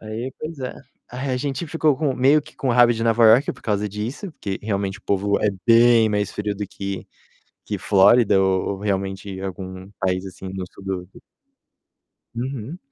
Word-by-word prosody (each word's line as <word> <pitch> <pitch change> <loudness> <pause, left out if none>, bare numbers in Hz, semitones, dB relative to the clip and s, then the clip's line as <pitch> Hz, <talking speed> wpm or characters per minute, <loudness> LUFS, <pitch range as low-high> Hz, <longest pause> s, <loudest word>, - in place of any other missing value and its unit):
Aí, 115 +4 -5
pois 155 0 -6
é. 125 - -4 0.4
Aí 130 +2 -4
a 130 - 0
gente 140 +5 -3
ficou 155 -3 +1
com 145 -4 0
meio 140 +4 +4
que - - -17
com 135 - -2
raiva 120 0 +6
de 115 - -3
Nova 115 0 +4
York 120 +6 +5
por - - -18
causa 105 -1 -1
disso, 115 - -5
porque 100 -9 -5
realmente 100 -1 -2
o - - -23
povo 100 +1 +1
é 105 - +3 0.2
bem 115 -1 +6
mais 105 -2 0
frio 105 0 -2
do 100 0 -4
que 100 -2 -5 0.6
que 105 - -3
Flórida 100 +2 +5
ou 95 -1 +1
ou - - -7
realmente 95 -1 -3
algum 95 0 -7
país 95 -1 0
assim 95 0 -9
do 95 -1 -4
sul 100 - -13
do 95 -2 -4 1.3
Uhum. 130 +5 -5
105 Hz, 185 wpm, -22 LUFS, 95-125 Hz, 1.3 s, raiva